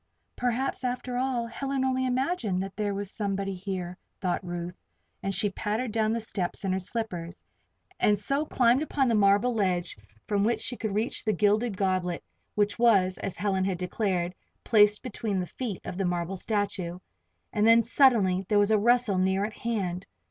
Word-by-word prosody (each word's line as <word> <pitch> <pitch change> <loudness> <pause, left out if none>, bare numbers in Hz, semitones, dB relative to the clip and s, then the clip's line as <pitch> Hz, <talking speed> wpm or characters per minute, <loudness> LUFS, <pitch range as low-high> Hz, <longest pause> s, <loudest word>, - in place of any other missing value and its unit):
"Perhaps, 250 +2 -1
after 250 0 -2
all, 250 -2 0
Helen 270 +3 -2
only 260 0 +1
imagined 250 - 0
there 205 -2 -1
was 200 -1 -3
somebody 195 -2 -2
here," 185 -1 -5 0.2
thought 185 0 -1
Ruth, 175 0 -6 0.4
and 195 - -1
she 205 +1 +1
pattered 215 +5 -2
down 220 0 +1
the 230 - 0
steps 200 -4 -3
in 190 - +1
her 190 - 0
slippers, 185 -3 -5 0.6
and 210 -1 +4
so 275 +8 +1
climbed 250 -3 +3
upon 285 -3 +1
the 235 - +2
marble 205 +3 +4
ledge 185 -5 0 0.3
from 200 -1 +1
which 225 +1 +1
she 245 - -3
could 220 -4 -3
reach 220 +3 -1
the 215 - +1
gilded 210 +2 +2
goblet 185 -3 0 0.3
which 205 +1 +1
was, 195 -6 +4
as 195 - -4
Helen 190 -2 0
had 190 -2 -1
declared, 180 -1 -1 0.3
placed 210 -2 +4
between 215 -5 -2
the 180 - -1
feet 215 0 -5
of 180 - -5
the 195 - +1
marble 175 +1 -1
statue. 195 -3 -2 0.6
And 210 +1 +3
then, 230 0 +7
suddenly, 225 -8 +4
there 210 - +3
was 205 +1 +3
a 215 - +4
rustle 235 -3 +3
near 190 +2 +2
at 215 - -5
hand. 195 -6 -3
205 Hz, 175 wpm, -28 LUFS, 185-235 Hz, 0.6 s, then